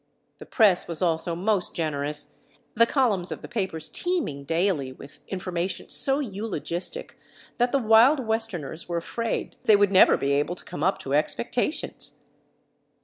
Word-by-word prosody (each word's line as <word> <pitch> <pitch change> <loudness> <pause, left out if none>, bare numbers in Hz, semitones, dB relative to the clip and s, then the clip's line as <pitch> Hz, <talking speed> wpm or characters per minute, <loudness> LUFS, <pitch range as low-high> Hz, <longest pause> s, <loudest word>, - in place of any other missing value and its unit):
The - - -11
press 205 -7 +3
was 170 +1 -2
also 165 0 0
most 195 +1 0
generous, 150 -2 -3 0.4
the 230 +1 +4
columns 220 -10 +1
of - - -6
the - - -7
papers 190 -9 -3
teeming 325 - -2
daily 165 -4 0
with 140 +2 -13
information 185 -1 -4
so 270 0 +3
eulogistic 205 - -5 0.4
that 245 +1 +2
the 275 - +3
Wild 235 +4 +5
Westerners 195 -9 -3
were 170 - -1
afraid 230 +7 -3
they 215 - +7
would 205 -1 +3
never 190 - +6
be 140 - -1
able 145 +5 0
to - - -14
come 170 -4 -6
up 190 +3 +2
to 135 - -4
expectations. 235 - -1
185 Hz, 150 wpm, -25 LUFS, 160-225 Hz, 0.4 s, they